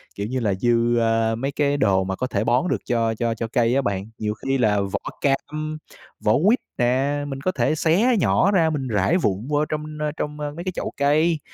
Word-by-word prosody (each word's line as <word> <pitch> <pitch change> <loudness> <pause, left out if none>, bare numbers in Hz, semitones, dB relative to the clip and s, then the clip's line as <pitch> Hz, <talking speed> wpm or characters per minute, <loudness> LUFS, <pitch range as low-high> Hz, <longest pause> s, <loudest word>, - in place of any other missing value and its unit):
kiểu 100 +1 -3
như 130 +2 -2
là, 105 -4 0
dư, 120 +3 +2
ơ, 115 -1 +2
mấy 135 +4 -2
cái 145 0 0
đồ 95 -8 +2
mà 95 0 -3
có 130 - -2
thể 105 -3 -1
bón 125 +10 +2
được - - +1
cho 115 -2 +1
cho 115 0 -1
cho 115 - -3
cây 120 +1 +1
á 140 - +3
bạn. 100 -1 -3
Nhiều 105 0 -2
khi 135 +5 -2
là 105 -4 +2
vỏ 100 +1 -2 0.2
cam, 155 +2 -1 0.5
vỏ - - +4
quýt 240 +4 +4 0.2
nè, 130 +4 +1
mình 135 -1 -6
có 185 - 0
thể 155 - 0
xé 195 +11 +3
nhỏ 200 +2 +3
ra 165 -5 +3
mình 140 -4 -2
rải 110 - +2
vụn 105 - -1
vô 150 0 +1
trong 150 0 -4 0.3
trong 150 0 -4
mấy 150 +3 -5
cái 185 - -1
chậu - - -4
cây, 155 +3 +2
130 Hz, 225 wpm, -23 LUFS, 115-150 Hz, 0.5 s, vỏ